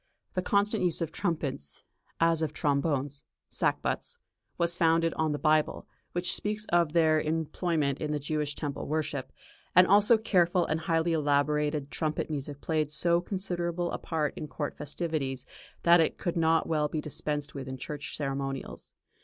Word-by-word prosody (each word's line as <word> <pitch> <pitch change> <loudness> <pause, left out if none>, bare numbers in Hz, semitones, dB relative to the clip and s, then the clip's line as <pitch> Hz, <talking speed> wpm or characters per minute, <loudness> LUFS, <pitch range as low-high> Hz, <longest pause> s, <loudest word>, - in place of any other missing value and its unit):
The 185 - 0
constant 205 +3 +1
use 175 -3 +1
of 165 -1 -2
trumpets, 145 - -3 0.4
as 165 -1 +3
of 155 -2 -1
trombones 140 -1 0 0.3
(sackbuts), 480 - -1 0.4
was 170 0 +2
founded 165 -1 +3
on 160 -1 0
the 145 - -1
Bible, 155 0 +1 0.3
which 175 0 +2
speaks 210 +1 -2
of 170 -3 +3
their 160 -2 +4
employment 155 -2 -1
in 150 -1 -1
the 150 - 0
Jewish 150 0 -2
temple 145 -2 -4
worship; 155 0 -2 0.4
and 180 +1 +9
also 205 +4 +6
careful 180 -5 +2
and 160 - -1
highly 165 0 +1
elaborated 150 -1 +1
trumpet 155 0 -2
music 145 -1 -5
played 155 -2 0
so 170 +3 +1
considerable 175 -2 -2
a - - -3
part 155 -3 -1
in 150 - -5
court 145 0 -4
festivities, 145 -4 -3 0.4
that 170 0 +7
it 160 - 0
could 175 - -2
not 165 -1 +3
well 150 -2 +1
be 155 - -3
dispensed 150 -1 -3
with 135 -2 -6
in 130 0 -5
church 145 +3 -6
ceremonials. 135 -2 -4
155 Hz, 160 wpm, -29 LUFS, 145-170 Hz, 0.4 s, and